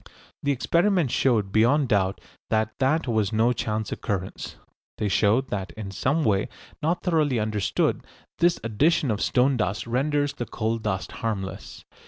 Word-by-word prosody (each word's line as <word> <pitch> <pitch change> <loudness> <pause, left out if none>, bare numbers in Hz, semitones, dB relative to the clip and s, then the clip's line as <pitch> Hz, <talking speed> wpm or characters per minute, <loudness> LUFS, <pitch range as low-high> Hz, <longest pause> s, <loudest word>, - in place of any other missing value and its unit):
The 145 - +1
experiments 170 - +1
showed 110 -7 +2
beyond 120 +6 +3
doubt 100 -2 +1 0.3
that 110 0 +1
that 150 +3 +1
was 110 -4 +1
no 115 +3 +3
chance 110 -1 -3
occurrence. 95 -2 -4 0.4
They 105 - -1
showed 110 +6 +2
that 95 -2 -4
in 105 -3 -7
some 140 +10 0
way 100 -4 +1 0.3
not 165 +4 0
thoroughly 155 -7 +2
understood 105 -3 0 0.4
this 175 0 +3
addition 140 +6 +2
of 105 - -2
stone 130 +1 +2
dust 105 0 -1
renders 145 +4 0
the 120 - -5
coal 115 0 -2
dust 95 -4 -3
harmless. 100 -4 -5
115 Hz, 150 wpm, -25 LUFS, 105-140 Hz, 0.4 s, beyond